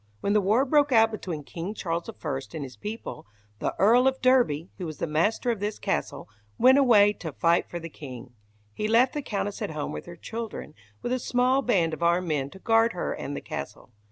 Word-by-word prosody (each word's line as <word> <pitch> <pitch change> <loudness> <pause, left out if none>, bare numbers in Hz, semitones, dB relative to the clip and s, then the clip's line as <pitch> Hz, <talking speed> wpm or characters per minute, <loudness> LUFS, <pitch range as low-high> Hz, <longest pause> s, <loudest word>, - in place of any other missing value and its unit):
When 200 - 0
the 210 - +4
war 215 +8 +3
broke 290 0 +3
out 225 -2 +5
between 175 -8 -5
King 175 +8 -6
Charles 170 -3 -3
I - - -6 0.4
and 155 - -4
his 130 -3 -9
people, 210 - -7 0.3
the - - -2
Earl 240 +6 +5
of 265 0 +1
Derby, 240 - +2
who 180 - -4
was 155 - -7
the - - -2
master 170 +10 +1
of 225 - -3
this 205 +1 -3
castle, 70 - -3 0.3
went 260 +2 +6
away 210 -6 +6
to 165 -6 -7
fight 170 +3 +1
for 175 - -5
the 165 - -7
king. 130 -6 -10 0.4
He 210 - -2
left 240 +4 +4
the 295 - -2
Countess 205 -5 -3
at - - -2
home 150 -2 -4
with - - -7
her 175 - -8
children, 220 -4 -6 0.3
with 245 - -1
a 255 - 0
small 250 +2 +2
band 180 -11 +1
of 160 - -6
armed 170 +1 +2
men 140 -3 -1
to 190 - -13
guard 225 +3 +3
her 180 - -2
and 145 - -5
the - - -5
castle. - - -7
200 Hz, 220 wpm, -26 LUFS, 165-235 Hz, 0.4 s, went